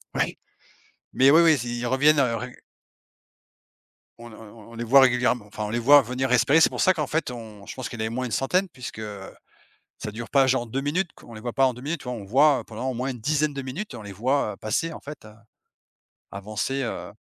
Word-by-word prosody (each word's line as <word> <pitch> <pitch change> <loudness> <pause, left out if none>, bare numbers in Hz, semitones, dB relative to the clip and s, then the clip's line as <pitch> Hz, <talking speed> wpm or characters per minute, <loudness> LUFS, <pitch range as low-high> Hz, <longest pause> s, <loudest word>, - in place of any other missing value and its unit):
Oui. - - -1 0.8
Mais 135 +2 +5
oui 160 +3 +7
oui, 165 -1 +6
s 130 -5 0
ils 120 0 -4
reviennent, 145 +4 +3
heu, 115 -3 +1
rég 125 +1 -7 1.6
on 120 0 -11
ne 110 - -13
on - - -15
on 115 -2 -15
on - - -12
les 120 - -4
voit 135 +4 +7
régulièrem 125 -2 +3
enfin 105 +1 -6
on - - -4
les 120 +2 -1
voit 145 +5 +7
revenir 130 +2 -3
respirer. 135 +6 +4
C'est - - +6
pour - - -7
ça 185 - +5
qu'en 150 -4 -3
fait 160 -5 -2
on 110 -4 -10
je - - -8
pense 130 - -5
qu'il 120 - -8
y - - -2
en - - 0
avait 110 - -4
au - - -5
moins 130 0 -2
une 120 - -6
centaine 180 - 0
puisque 125 -5 -8 1.0
ça 105 - -6
dure 115 +2 -7
pas 135 -1 +4
genre 130 -2 +1
2 135 +5 -3
minutes 165 +5 -1
qu - - -17
on 115 - -12
les 110 - -9
voit 120 0 -5
pas 135 - +3
en 130 - +1
2 125 - -12
minutes, 160 +5 -4
tu - - -12
vois? 125 0 -4
On 105 -4 -7
voit, 140 +6 +4
heu, - - -8
pendant 120 +4 -5
au - - -3
moins 125 +3 -3
une 125 -3 -6
dizaine 150 +4 0
de 140 - -4
minutes, 140 - -6
on 110 - -9
les 100 - -8
voit, 120 +3 0
heu, - - -13
passer 155 +10 -2
en - - -9
fait, 145 -6 -10
heu, 105 - -13 1.0
avancer 110 +7 -3
heu, 115 - -5
125 Hz, 265 wpm, -24 LUFS, 115-140 Hz, 1.6 s, oui